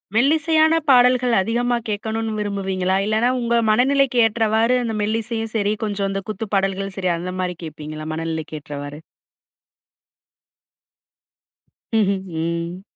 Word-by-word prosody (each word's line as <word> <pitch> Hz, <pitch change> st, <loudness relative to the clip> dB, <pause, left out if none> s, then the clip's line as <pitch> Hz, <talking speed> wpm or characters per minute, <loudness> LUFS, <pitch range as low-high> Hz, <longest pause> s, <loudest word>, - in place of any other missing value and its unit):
மெல்லிசையான 315 Hz, +5 st, +3 dB, 0.2 s
பாடல்கள் 250 Hz, -1 st, +5 dB
அதிகமா 240 Hz, +4 st, 0 dB
கேட்கணுனு 220 Hz, +2 st, -2 dB
விரும்புவீங்களா? 190 Hz, -2 st, -1 dB
இல்லன்னா, 220 Hz, +3 st, +2 dB
உங்க 235 Hz, -1 st, 0 dB
மனநிலைக்கு 255 Hz, +3 st, +3 dB
ஏற்றவாறு 225 Hz, +2 st, +2 dB
அந்த 225 Hz, -2 st, -2 dB
மெல்லிசையும் 225 Hz, +1 st, -2 dB
சரி, 210 Hz, -1 st, +1 dB
கொஞ்சம் 200 Hz, -1 st, -2 dB
இந்த 195 Hz, 0 st, -2 dB
குத்து 215 Hz, +1 st, -4 dB
பாடல்களும் 195 Hz, 0 st, -1 dB
சரி 185 Hz, -2 st, 0 dB
அந்தமாரி 180 Hz, +1 st, -3 dB
கேப்பீங்களா? 155 Hz, -1 st, -7 dB
மனநிலைக்கேற்றவாறு. 155 Hz, -2 st, -5 dB, 3.0 s
ம்ஹும், 195 Hz, -2 st, +1 dB, 0.2 s
ம். 170 Hz, +2 st, -3 dB
210 Hz, 100 wpm, -21 LUFS, 185-235 Hz, 3.0 s, பாடல்கள்